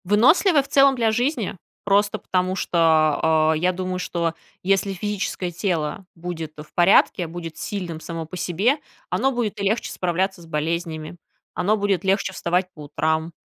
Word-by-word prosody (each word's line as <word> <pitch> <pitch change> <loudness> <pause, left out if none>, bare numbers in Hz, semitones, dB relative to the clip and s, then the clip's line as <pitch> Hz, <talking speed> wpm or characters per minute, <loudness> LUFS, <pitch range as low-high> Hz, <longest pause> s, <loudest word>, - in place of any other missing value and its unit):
Выносливое 275 - +4
в - - -13
целом 275 -1 +5
для 230 -3 +2
жизни. 245 -2 -1 0.3
Просто 205 +1 +2
потому 185 0 -1
что, 185 - -2 0.7
а, - - +3
я 180 +4 +2
думаю, 185 0 -3
что 170 -2 -1 0.3
если 195 +1 +1
физическое 190 -2 -3
тело 170 -1 -2
будет 165 -2 -6
в 150 0 -11
порядке, 175 0 +4
будет 165 -1 -7
сильным 180 -6 -4
само 165 0 -6
по 170 +4 -8
себе, 200 - +1 0.3
оно 270 - +1
будет 225 -4 -2
и - - -2
легче 215 +4 0
справляться 185 +1 -1
с - - -13
болезнями, 160 +1 -3 0.4
оно 205 +4 +1
будет 200 -4 0
легче 195 0 +1
вставать 180 +1 -1
по 150 - -11
утрам. 160 +3 -1
185 Hz, 160 wpm, -23 LUFS, 170-205 Hz, 0.7 s, целом